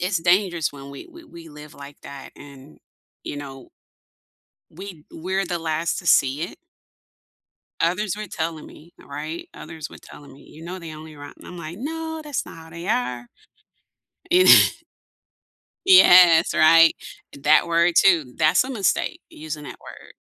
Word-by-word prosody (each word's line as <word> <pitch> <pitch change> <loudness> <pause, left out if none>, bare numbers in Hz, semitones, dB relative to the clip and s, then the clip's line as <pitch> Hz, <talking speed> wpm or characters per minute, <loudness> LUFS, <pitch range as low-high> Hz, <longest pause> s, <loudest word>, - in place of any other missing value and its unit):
it's 180 0 -1
dangerous 175 -2 +1
when 140 -1 -11
we 140 - -11
we 340 0 -15
we 170 - -14
live 150 0 -13
like 140 +1 -13
that 140 -1 -11
and, 140 0 -15 0.5
you - - -6
know 135 -2 -10 1.0
we 175 -2 -11
we're 190 +4 -3
the 175 -1 -4
last 165 0 -2
to 175 - -9
see 135 -1 +3
it? 175 - -6 1.2
Others 185 +4 -1
were 215 -1 -7
telling 160 -2 -5
me, 170 +3 -17
th - - -19
right? 155 +4 -7
Others 160 -2 -9
were - - -13
telling 145 -1 -15
me, 140 - -18
"You 160 +2 -14
know 180 +2 -7
they 165 -2 -9
only 155 0 -12
rot" 145 0 -12
And - - -15
I'm 180 - -10
like, 170 +2 -8
"No, 320 +3 -6
that's 295 -3 -4
not - - -12
how 160 0 -14
they 170 +2 -9
are." 125 - -2 1.0
You 365 +1 +5
kn - - +9 1.3
Yes, 180 - +6
right? 165 0 +5 0.4
And 140 - -14
that 155 +3 +4
word, 170 +1 +2
too. 165 -10 +2
That's 155 +8 +3
a 260 - -8
mistake, 210 -8 -2
using 150 -1 -8
that - - -10
word. - - -14
165 Hz, 170 wpm, -22 LUFS, 150-185 Hz, 1.3 s, kn